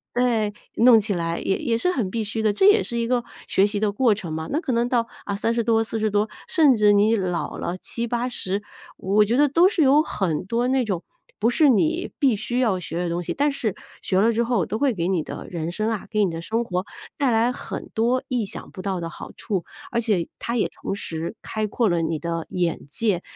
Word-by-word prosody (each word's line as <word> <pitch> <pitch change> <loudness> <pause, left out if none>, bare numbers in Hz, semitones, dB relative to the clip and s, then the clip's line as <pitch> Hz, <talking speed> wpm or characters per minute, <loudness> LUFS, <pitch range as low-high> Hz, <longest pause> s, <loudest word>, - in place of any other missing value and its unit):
诶， 230 -4 +2 0.3
弄 230 -1 +7
起 210 -1 -1
来 170 -1 -2
也 190 - 0
也 230 - 0
是 360 +10 +1
很 225 - -1
必 225 +2 -2
须 220 +2 -3
的， 215 -1 +3
这 210 - +2
也 415 +1 +6
是 235 - -3
一 235 - 0
个 245 -1 +1 0.2
学 195 +2 +3
习 205 -1 -2
的 210 -1 +1
过 220 0 +3
程 170 -5 -6
嘛。 160 0 -4
那 300 - +1
可 305 -6 -3
能 235 +1 +1
到， 235 -3 +1 0.2
啊， 200 - -2
30 230 +3 0
多、 225 -1 +3
40 220 -1 -1
多， 205 +1 +1 0.2
甚 305 -7 +5
至 210 -2 +5
你 210 +3 +4
老 180 -4 -2
了， 175 +2 -3
70-80， 235 -3 -3 0.3
我 205 +3 +3
觉 235 +5 +1
得 295 - +5
都 335 +6 +5
是 350 -6 +2
有 285 +3 +6
很 180 - -2
多 235 +4 0
那 260 -1 +2
种， 195 -6 -2 0.3
不 230 +3 +2
是 300 +3 +5
你 315 - +2
必 265 -7 +3
须 240 +4 -3
要 210 -7 +2
学 165 -1 -5
的 175 -1 -1
东 170 +1 -1
西， - - -4
但 290 +1 +1
是 235 -8 -2 0.3
学 185 - +1
了 225 +3 +4
之 235 +2 +1
后 240 0 +1
都 220 - -3
会 280 -3 +3
给 170 -2 -2
你 185 -4 +1
的 - - -7
人 165 -2 -3
生 215 +5 -1
啊， 215 - -4
给 215 -2 +2
你 180 - -1
的 165 0 -5
生 225 +7 -1
活 180 -4 -2 0.3
带 275 -3 +2
来 230 +2 +3
很 - - -6
多 240 +3 +1
意 245 -3 0
想 - - -9
不 185 - -8
到 190 -2 -2
的 165 -1 -5
好 - - -9
处。 190 -6 -3 0.3
而 235 0 +1
且 205 -7 0
它 235 - -3
也 - - +2
同 195 - -2
时 165 +1 -5
开 215 -1 -2
阔 225 +2 +1
了 170 -1 +1
你 160 0 -1
的 165 0 -4
眼 175 -2 -1
界， 200 - 0
220 Hz, 250 characters per minute, -23 LUFS, 185-240 Hz, 0.3 s, 弄